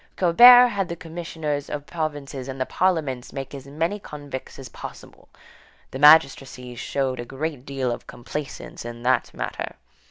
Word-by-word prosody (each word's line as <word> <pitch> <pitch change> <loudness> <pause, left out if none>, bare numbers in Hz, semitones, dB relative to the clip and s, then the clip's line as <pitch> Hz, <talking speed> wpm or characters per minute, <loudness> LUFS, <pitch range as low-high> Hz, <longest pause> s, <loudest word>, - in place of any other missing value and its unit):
Colbert 245 +8 +8
had 195 -4 -2
the 170 - -3
commissioners 160 -4 -5
of 145 -1 -5
provinces 145 -5 -4
and 135 0 -6
the 130 - 0
parliaments 150 -10 -1
make 135 0 -6
as 135 -1 -9
many 165 +8 -2
convicts 145 -7 -8
as 135 - -9
possible. - - -11 0.6
The 130 - -6
magistracy 135 -4 +4
showed 130 +1 -2
a - - -3
great 140 +1 -5
deal 135 -3 -2
of 120 - -6
complaisance 135 +4 -7
in 120 0 -8
the 130 +1 +3
matter. - - -5
145 Hz, 155 wpm, -24 LUFS, 130-160 Hz, 0.6 s, Colbert